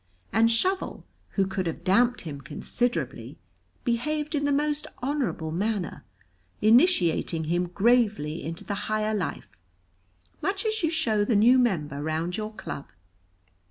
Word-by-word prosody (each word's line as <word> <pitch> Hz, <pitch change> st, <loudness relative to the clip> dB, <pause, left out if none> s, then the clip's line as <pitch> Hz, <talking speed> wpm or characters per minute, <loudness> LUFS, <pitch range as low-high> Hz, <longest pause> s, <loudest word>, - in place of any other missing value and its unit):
And 225 Hz, +2 st, +5 dB
Shovel, 370 Hz, +12 st, 0 dB, 0.3 s
who 195 Hz, -, +2 dB
could 190 Hz, -1 st, -2 dB
have 165 Hz, -, -4 dB
damped 240 Hz, +7 st, +3 dB
him 145 Hz, -4 st, -7 dB
considerably, 240 Hz, -, -3 dB, 0.5 s
behaved 300 Hz, +6 st, -1 dB
in 290 Hz, -1 st, 0 dB
the 285 Hz, -, +2 dB
most 295 Hz, +1 st, 0 dB, 0.2 s
honorable 260 Hz, -, -1 dB
manner, 200 Hz, +1 st, -2 dB, 0.6 s
initiating 215 Hz, -, +3 dB
him 175 Hz, +3 st, 0 dB
gravely 205 Hz, -6 st, +2 dB
into 165 Hz, +1 st, -5 dB
the 205 Hz, -, -3 dB, 0.2 s
higher 215 Hz, 0 st, 0 dB
life, 160 Hz, -, -4 dB, 0.8 s
much 390 Hz, +2 st, -1 dB
as 440 Hz, 0 st, 0 dB
you 325 Hz, -, +2 dB
show 230 Hz, -11 st, +1 dB
the 215 Hz, +2 st, +1 dB
new 240 Hz, +5 st, +6 dB
member 150 Hz, -, 0 dB
round 160 Hz, +3 st, -2 dB
your 215 Hz, 0 st, -4 dB
club. 140 Hz, -, -6 dB
215 Hz, 135 wpm, -27 LUFS, 170-260 Hz, 0.8 s, new